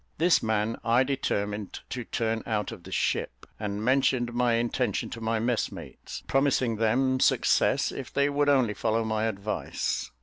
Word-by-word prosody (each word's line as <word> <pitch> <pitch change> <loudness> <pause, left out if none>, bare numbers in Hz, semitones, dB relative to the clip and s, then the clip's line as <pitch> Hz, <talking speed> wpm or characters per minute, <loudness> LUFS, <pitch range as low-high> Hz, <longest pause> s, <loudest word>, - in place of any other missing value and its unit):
This 170 +3 +4
man 110 0 0
I 120 +2 +4
determined 105 -7 -2
to 125 - -3
turn 115 -1 -1
out 105 -3 -1
of - - -9
the - - -10
ship, - - -1
and 105 0 -3
mentioned 130 -2 +2
my 120 -1 +2
intention 120 -1 -1
to 115 - -7
my 115 0 0
messmates, 115 +1 -3
promising 135 -4 +1
them 130 +4 +2
success - - +3
if - - -7
they 140 0 +2
would 145 0 +1
only 130 -6 +3
follow 110 +2 0
my 110 0 -1
advice. 105 -1 -2
115 Hz, 160 wpm, -27 LUFS, 110-130 Hz, -, This